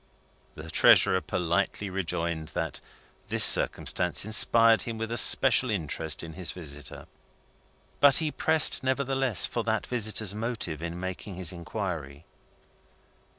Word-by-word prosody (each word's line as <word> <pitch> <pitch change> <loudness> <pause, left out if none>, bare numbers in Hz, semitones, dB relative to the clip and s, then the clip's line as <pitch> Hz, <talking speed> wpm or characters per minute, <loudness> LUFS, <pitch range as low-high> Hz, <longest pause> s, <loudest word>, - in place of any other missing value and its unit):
The 80 +1 -10
Treasurer 95 +4 +4
politely 90 +4 -2
rejoined 85 -3 -4
that - - -4 0.5
this - - +3
circumstance 90 +2 +3
inspired 115 +1 +4
him 115 -1 -4
with 115 +1 -5
a - - -2
special 130 0 +4
interest 80 -5 -3
in 80 -1 -9
his 90 +1 -3
visitor. 75 -5 -10 0.9
But 140 -2 +6
he 155 -2 -1
pressed, 160 -4 +3
nevertheless 130 -4 0
for 115 - -4
that 110 -1 -2
visitor's 110 -4 -2
motive 110 -8 -5
in 85 +1 -6
making 95 +1 -7
his 90 -2 -2
inquiry. 85 -5 -7
95 Hz, 125 wpm, -26 LUFS, 85-115 Hz, 0.9 s, But